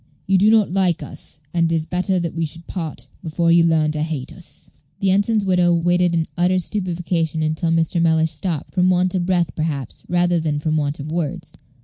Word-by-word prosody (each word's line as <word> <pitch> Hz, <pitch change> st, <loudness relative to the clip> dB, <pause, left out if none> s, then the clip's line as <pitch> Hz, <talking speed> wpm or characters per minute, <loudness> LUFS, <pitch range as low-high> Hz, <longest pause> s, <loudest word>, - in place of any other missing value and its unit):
You 190 Hz, 0 st, +3 dB
do 205 Hz, +3 st, +5 dB
not 220 Hz, -4 st, +4 dB
like 180 Hz, -3 st, +1 dB
us, 150 Hz, -, -10 dB
and 170 Hz, -1 st, +2 dB
it -, -, +2 dB
is 160 Hz, -1 st, -1 dB
better 180 Hz, +2 st, 0 dB
that 170 Hz, -2 st, -3 dB
we 165 Hz, -, -2 dB
should 165 Hz, +2 st, -5 dB
part 155 Hz, -8 st, -6 dB
before 170 Hz, +1 st, 0 dB
you 170 Hz, 0 st, +6 dB
learn 160 Hz, -2 st, +2 dB
to 155 Hz, 0 st, -3 dB
hate 155 Hz, -4 st, -4 dB
us." -, -, -11 dB, 0.3 s
The 195 Hz, -1 st, +2 dB
ensign's 205 Hz, +2 st, +2 dB
widow 180 Hz, -2 st, +3 dB
waited 175 Hz, +1 st, +2 dB
in 165 Hz, -1 st, +1 dB
utter 180 Hz, +1 st, +2 dB
stupefaction 175 Hz, -4 st, -2 dB
until 155 Hz, +2 st, -1 dB
Mr. 165 Hz, +1 st, +1 dB
Mellish 160 Hz, -1 st, +2 dB
stopped, 160 Hz, -1 st, -4 dB
from 185 Hz, 0 st, +3 dB
want 180 Hz, 0 st, +2 dB
of 180 Hz, -2 st, -1 dB
breath, 175 Hz, -3 st, +1 dB
perhaps, 150 Hz, -6 st, -4 dB
rather 175 Hz, -1 st, +2 dB
than 155 Hz, -2 st, -1 dB
from 155 Hz, +1 st, -1 dB
want 145 Hz, -1 st, -1 dB
of 150 Hz, +2 st, -6 dB
words. 165 Hz, 0 st, -3 dB
170 Hz, 210 wpm, -20 LUFS, 160-180 Hz, 0.3 s, you